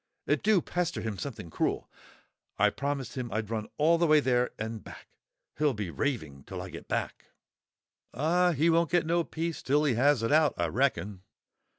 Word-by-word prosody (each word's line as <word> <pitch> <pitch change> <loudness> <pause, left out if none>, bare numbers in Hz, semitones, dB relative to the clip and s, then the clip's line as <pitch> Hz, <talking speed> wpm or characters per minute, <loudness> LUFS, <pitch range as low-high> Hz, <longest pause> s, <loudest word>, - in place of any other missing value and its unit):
It - - +1
do 210 -3 +4
pester 175 -1 -2
him 110 -4 -4
something 115 - -6
cruel. - - -1 0.7
I - - +4
promised 140 -3 -3
him 125 -3 -4
I'd 110 +1 -3
run 110 -2 -2
all 165 +3 +4
the 170 - +3
way 155 0 +6
there 125 -3 +2
and 110 0 -5
back; - - -12 0.5
he'll 150 -4 +2
be 105 -5 -4
raving 80 - -3
till - - -7
I - - -7
get - - -9
back." - - -3 0.9
"Ah, 175 +7 +2
he 155 +3 +2
won't 165 -1 +3
get 175 -1 +2
no 170 +1 +2
peace 165 0 -4
till 145 +3 +2
he 145 -4 +2
has 130 +1 +3
it 115 - 0
out, 155 0 +4
I 85 -1 0
reckon." 105 - 0
140 Hz, 190 wpm, -29 LUFS, 110-160 Hz, 0.9 s, way